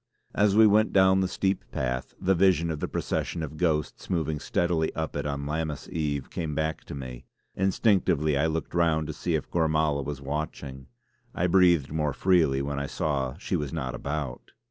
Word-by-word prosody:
As 105 -1 +3
we 110 +1 +7
went 110 +1 +4
down 95 0 +5
the 95 - +1
steep 95 +1 -1
path, 65 -1 -3
the 95 - +2
vision 90 -3 +3
of 75 - -4
the - - -2
procession 85 - -2
of 75 0 -6
ghosts 75 -3 -1
moving 80 -4 -1
steadily 85 -1 0
up 80 -1 -3
it - - -2
on 70 -1 -3
Lammas 75 0 -3
Eve, 75 -4 -2
came 80 -3 -3
back 80 0 -2
to - - -7
me; 65 -3 -8 0.3
instinctively 95 -6 +2
I 75 +3 +2
looked 80 0 -3
round 80 -2 +2
to - - -5
see - - -1
if - - -4
Gormala 80 -3 +1
was 70 0 -5
watching. 70 -2 -5 0.5
I 90 - +1
breathed 85 -6 +4
more 75 -3 0
freely 80 -7 +2
when 70 0 -3
I 70 - -3
saw 70 -3 -2
she 95 - -3
was 75 -5 -2
not 65 -6 -3
about. 70 -3 -5
80 Hz, 190 wpm, -27 LUFS, 70-85 Hz, 0.5 s, we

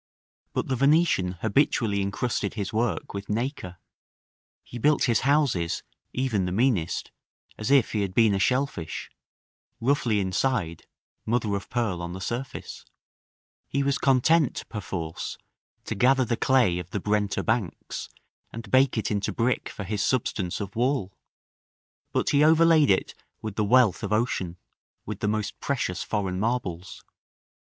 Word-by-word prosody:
But - - -1
the 130 - 0
Venetian 140 - +3
habitually 110 -3 +2
incrusted 100 +1 -2
his 100 -2 -3
work 115 0 -1
with 100 0 -6
nacre; 110 -5 -3 0.9
he 120 - -9
built 150 +4 +3
his 120 -5 +3
houses, 135 - +1 0.3
even 120 -7 0
the 90 - -2
meanest, 100 -5 0 0.4
as 110 - -4
if 135 -4 +4
he 105 - 0
had 95 -2 -3
been 110 -3 +5
a 95 - 0
shell 130 +7 +3
fish, 85 - -7 0.7
roughly 120 -4 +1
inside, 95 -2 -1 0.4
mother 110 -2 0
of 100 - -5
pearl 115 -8 -1
on 85 0 -5
the 95 - -6
surface: 120 +7 -5 0.8
he 140 +1 0
was 140 0 +1
content, 140 +2 +2
perforce, 90 -6 -5 0.5
to - - -3
gather 130 +4 +3
the 115 - 0
clay 120 -10 +3
of 90 -1 -7
the 100 - -3
Brenta 105 0 0
banks, 110 - -2 0.4
and 115 -3 -8
bake 130 -1 +4
it 110 - -1
into 100 -1 -1
brick 120 +2 0
for 100 - -7
his 100 +1 -2
substance 105 -8 -1
of 100 -1 -6
wall; 120 -5 0 1.0
but - - 0
he 145 0 +4
overlaid 160 -1 +5
it 95 - +2 0.3
with 110 -2 -4
the 110 - +1
wealth 115 -2 +4
of - - -4
ocean, 105 -6 0 0.5
with - - -5
the - - -1
most 105 -1 -2
precious 120 -10 -2
foreign 95 -4 -2
marbles. 100 -6 -3
110 Hz, 150 wpm, -26 LUFS, 95-130 Hz, 1.0 s, been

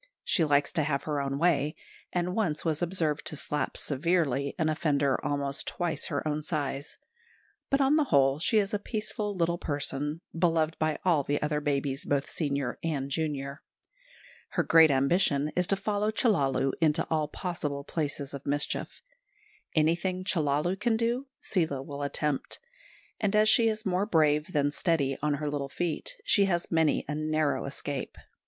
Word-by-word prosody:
She 170 - +2
likes 145 -1 +2
to 160 - +1
have 140 -2 -1
her 150 -2 -1
own 135 0 -2
way, 150 -2 +2 0.4
and 180 0 -1
once 175 -8 -1
was 160 -1 0
observed 165 -4 0
to - - -3
slap 145 -1 -2
severely 140 -2 0
an 160 -3 +1
offender 145 -3 +1
almost 140 -1 -2
twice 175 -2 -1
her 145 0 -2
own 150 0 -1
size; 145 -2 -3 0.7
but 275 0 +2
on 275 +3 +4
the 305 - +3
whole 140 - +3
she 215 +7 +2
is 200 -1 +1
a 210 - +1
peaceful 210 -1 -3
little 170 -1 0
person, 145 +2 -3
beloved 165 -2 +2
by 155 -1 +1
all 170 -5 +4
the 145 +1 -1
other 150 0 0
babies, 140 -1 -1
both 140 -1 -1
senior 140 -5 -2
and 140 -4 -2
junior. 140 -2 -3 0.9
Her - - +2
great 160 -1 +7
ambition 140 +1 +2
is 180 -1 +2
to 195 - +4
follow 210 +1 -1
Chellalu 145 - +2
into 160 0 +3
all 155 -2 +1
possible 150 -4 -4
places 145 -2 -3
of 140 -1 -6
mischief. 145 +1 -2 0.7
Anything 175 +4 +1
Chellalu 170 +1 0
can 225 +1 +2
do 240 +4 -1
Seela 160 -8 -1
will 140 0 -7
attempt; 145 0 -2 0.6
and 210 -1 0
as 215 0 +5
she 225 +1 +6
is 215 0 -3
more 190 +1 +1
brave 155 -3 +2
than 145 -2 +1
steady 145 -4 +1
on 150 0 +1
her 150 +1 -3
little 145 -1 -2
feet, 170 +1 -3
she 200 - +4
has 175 -3 -1
many 160 -2 +2
a 150 - -2
narrow 155 -1 0
escape. 140 0 -5
155 Hz, 165 wpm, -29 LUFS, 140-175 Hz, 0.9 s, great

